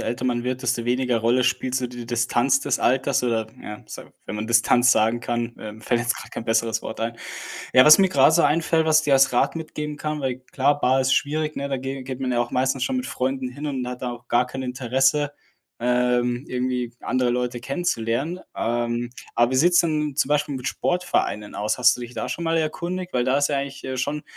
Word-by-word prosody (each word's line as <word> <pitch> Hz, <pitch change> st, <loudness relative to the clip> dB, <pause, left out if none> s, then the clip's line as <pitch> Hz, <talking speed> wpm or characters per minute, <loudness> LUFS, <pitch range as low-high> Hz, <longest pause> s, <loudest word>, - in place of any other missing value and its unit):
älter 120 Hz, +2 st, -3 dB
man 120 Hz, -1 st, 0 dB
wird, 130 Hz, +1 st, -3 dB
desto 120 Hz, -1 st, -1 dB
weniger 125 Hz, -1 st, +1 dB
Rolle 120 Hz, +3 st, +2 dB
spielt 130 Hz, +1 st, 0 dB
so 125 Hz, -1 st, -1 dB
die 120 Hz, -1 st, -8 dB
Distanz 120 Hz, +3 st, +2 dB
des -, -, 0 dB
Alters 130 Hz, 0 st, +1 dB
oder 110 Hz, -2 st, 0 dB
ja, 105 Hz, 0 st, -8 dB
so -, -, -8 dB, 0.2 s
wenn 105 Hz, -, -5 dB
man 105 Hz, +1 st, -4 dB
Distanz 120 Hz, +2 st, +4 dB
sagen 110 Hz, +2 st, +2 dB
kann, 120 Hz, 0 st, -3 dB
ähm, 110 Hz, 0 st, -9 dB
fällt 120 Hz, +1 st, 0 dB
jetzt 120 Hz, +1 st, 0 dB
gerade -, -, -10 dB
kein -, -, -6 dB
besseres 115 Hz, 0 st, 0 dB
Wort 110 Hz, -, -6 dB
ein. 115 Hz, +1 st, -2 dB, 0.6 s
Ja, 130 Hz, -, +7 dB
was 155 Hz, +3 st, +9 dB
mir 190 Hz, -1 st, +4 dB
grade 140 Hz, -3 st, +5 dB
so 170 Hz, -, +4 dB
einfällt, 160 Hz, +1 st, +2 dB
was 155 Hz, 0 st, +5 dB
ich 155 Hz, -, -8 dB
dir 140 Hz, -, +4 dB
als 135 Hz, -1 st, +4 dB
Rat 125 Hz, -, +1 dB
mitgeben 150 Hz, -2 st, -5 dB
kann 150 Hz, 0 st, -3 dB
weil, 130 Hz, -2 st, -2 dB
klar, 145 Hz, +2 st, +2 dB
Bar 130 Hz, +1 st, +3 dB
ist 130 Hz, 0 st, +2 dB
schwierig, 155 Hz, +1 st, -1 dB
ne, 140 Hz, 0 st, -3 dB
da 135 Hz, -, -1 dB
ge 135 Hz, 0 st, -5 dB
geht 130 Hz, 0 st, -6 dB
man 130 Hz, -1 st, -1 dB
ja 120 Hz, -1 st, +1 dB
auch 120 Hz, -, -2 dB
meistens 130 Hz, 0 st, +1 dB
schon 260 Hz, -, -1 dB
mit 255 Hz, -, -2 dB
Freunden 130 Hz, 0 st, -2 dB
hin 145 Hz, +4 st, -7 dB
und 130 Hz, -3 st, -3 dB
hat 125 Hz, +1 st, -7 dB
da 125 Hz, -1 st, -2 dB
auch 120 Hz, 0 st, -12 dB
gar 125 Hz, +1 st, +2 dB
kein 130 Hz, +1 st, -6 dB
Interesse, 135 Hz, +3 st, +1 dB, 0.5 s
ähm, 125 Hz, 0 st, +1 dB
irgendwie 125 Hz, -1 st, -2 dB
andere 125 Hz, -1 st, 0 dB
Leute 125 Hz, 0 st, -1 dB
kennenzulernen. 135 Hz, +2 st, -2 dB, 0.2 s
Ähm, 120 Hz, +1 st, -1 dB, 0.2 s
aber 120 Hz, +1 st, +3 dB
wie 130 Hz, -, 0 dB
sieht's 175 Hz, +5 st, +5 dB
denn 150 Hz, -3 st, -1 dB
zum 140 Hz, -, +1 dB
Beispiel 150 Hz, -1 st, 0 dB
mit 125 Hz, 0 st, -3 dB
Sportvereinen 175 Hz, -, -1 dB
aus? 105 Hz, +3 st, -1 dB
Hast 125 Hz, 0 st, +5 dB
du -, -, -10 dB
dich 120 Hz, 0 st, -8 dB
da -, -, -3 dB
schon 170 Hz, -, -4 dB
mal 165 Hz, 0 st, +1 dB
erkundigt? 175 Hz, +3 st, -3 dB
Weil 125 Hz, -1 st, +1 dB
da 130 Hz, +2 st, +2 dB
ist 145 Hz, -, +2 dB
ja 145 Hz, -, 0 dB
eigentlich, 140 Hz, 0 st, -5 dB
äh, 130 Hz, 0 st, -4 dB
schon 145 Hz, +4 st, -2 dB
130 Hz, 230 wpm, -23 LUFS, 120-145 Hz, 0.6 s, was